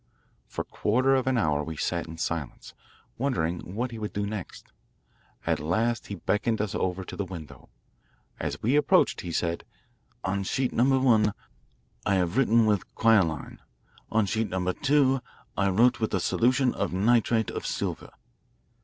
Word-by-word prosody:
For - - -4
a - - -32
quarter 130 +5 +2
of 130 -1 +1
an 130 -1 +2
hour 75 -7 +1
we 80 0 -6
sat 85 +2 -2
in 80 0 -9
silence, 80 -4 -4 0.5
wondering 90 -8 -2
what 120 +3 -2
he 115 - -7
would 105 -1 -4
do 100 0 -1
next. 100 -3 -7 0.7
At - - +1
last 110 +10 0
he 100 - -5
beckoned 110 +4 0
us 105 -2 -2
over 95 +1 -1
to - - -8
the 100 - -2
window. 85 -5 -10 0.7
As - - -3
we 125 +6 +3
approached 150 - +3
he 85 - -5
said, 85 0 -1 0.6
"On 100 +1 -1
sheet 130 +6 -1
number 130 +3 +3
one 110 -5 +3 0.7
I 100 - +2
have 90 0 0
written 115 -3 +4
with 105 -2 0
quinoline; 95 -9 +2 0.5
on 110 -1 +2
sheet 110 +2 -1
number 90 0 -1
two 135 0 +2 0.3
I 100 -1 +2
wrote 115 +6 +4
with 110 - 0
a - - +1
solution 130 +2 +2
of - - -2
nitrate 110 +3 +2
of - - -4
silver." - - -3
105 Hz, 165 wpm, -27 LUFS, 90-120 Hz, 0.7 s, written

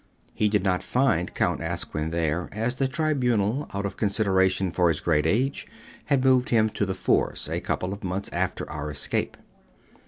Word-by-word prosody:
He 105 - +1
did 105 -2 +1
not 90 -2 +1
find 115 -10 +1
Count - - 0
Asquin 75 +1 -3
there, 85 0 -1
as 115 +4 -1
the 135 +1 0
Tribunal, 130 -5 0
out 100 0 -3
of 100 -1 -4
consideration 95 -3 +1
for 90 0 +3
his 80 - 0
great 80 -2 +1
age, 130 +10 0 0.4
had 135 -3 +1
moved 130 -1 +4
him 110 -2 +3
to 105 - -1
The 95 - -2
Fours 95 - 0
a - - -2
couple 95 +1 -2
of 100 +2 -9
months 95 +2 -3
after - - -2
our 75 0 -5
escape. 70 -1 -1
100 Hz, 180 wpm, -26 LUFS, 90-125 Hz, 0.4 s, moved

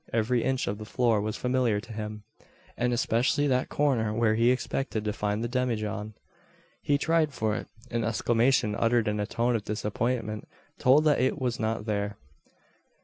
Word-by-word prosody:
Every 115 +1 +1
inch 130 -1 0
of 100 +1 -3
the 110 - -7
floor 115 -2 +1
was 110 0 -3
familiar 125 -4 +1
to 115 +1 -10
him; 105 -1 -6 0.5
and 125 0 0
especially 120 +4 +1
that 130 -2 +1
corner 125 -7 +1
where 115 -1 +3
he 115 +2 +3
expected 125 -3 -1
to 105 - 0
find 105 0 -1
the - - 0
demijohn. 110 -4 -2 0.7
He 145 - +2
tried 155 -1 +1
for 110 -1 0
it. - - -5 0.2
An 115 -1 0
exclamation 115 +1 +2
uttered 115 +1 +2
in 105 0 0
a 105 - -1
tone 120 +1 0
of 110 - -1
disappointment 110 +1 -2 0.3
told 135 +4 +5
that 150 -2 +3
it 130 +3 +1
was 125 -3 -1
not 110 -1 -1
there. 100 -2 -2
115 Hz, 175 wpm, -28 LUFS, 105-125 Hz, 0.7 s, told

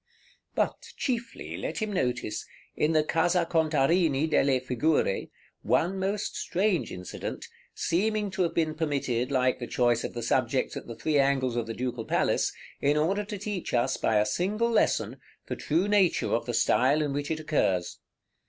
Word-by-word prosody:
But - - -2
chiefly 240 -1 -3
let - - -4
him 215 -2 -2
notice, 125 - -1 0.3
in 155 +2 +1
the 155 -1 +4
Casa 170 +2 +2
Contarini 160 -1 +2
delle 135 -4 +3
Figure, 130 -3 0 0.3
one 190 +3 +1
most 195 +2 -2
strange 185 -1 0
incident, 90 0 -6 0.3
seeming 210 +4 0
to 190 - -2
have 170 -2 0
been 160 -2 +1
permitted, 140 -6 -1
like 130 -2 +2
the 120 - -5
choice 120 -2 +2
of - - -5
the 120 - -4
subjects 130 +2 0
at - - -7
the 115 - -7
three 150 +3 +1
angles 135 -3 +2
of 120 -2 -1
the 115 - -4
Ducal 125 -2 -3
Palace, - - +1 0.3
in 145 +1 +3
order 190 +7 +1
to 205 0 -6
teach 200 -7 -3
us, 120 +2 +2
by 110 - 0
a 105 0 +4
single 205 - 0
lesson, 225 - +1 0.3
the - - -4
true 170 +6 0
nature 205 -4 +2
of 115 +1 0
the 120 - -2
style 135 +6 +3
in 145 -2 -2
which 145 +1 -3
it 160 -1 -1
occurs. 120 - 0
150 Hz, 170 wpm, -28 LUFS, 125-180 Hz, 0.3 s, the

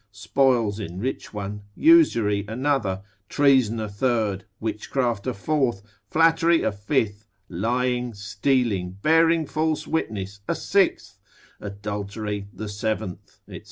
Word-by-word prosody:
spoils 115 0 +1
enrich 100 +7 -4
one, 105 0 -5
usury 115 - +4
another, 110 -6 -1 0.3
treason 130 -6 +3
a 110 - -3
third, 105 -3 -1
witchcraft 110 +1 -2
a - - +1
fourth, 120 -3 0 0.3
flattery 165 +1 +4
a - - +1
fifth, 105 0 -1 0.2
lying, 125 +6 -1
stealing, 105 -3 -1
bearing 165 +1 +4
false 155 +1 -1
witness 100 -10 -3
a - - 0
sixth, 195 -1 0 0.4
adultery 100 0 -5
the 110 - -7
seventh, 105 -3 -4
&c. - - -8
110 Hz, 110 wpm, -24 LUFS, 100-135 Hz, 0.4 s, usury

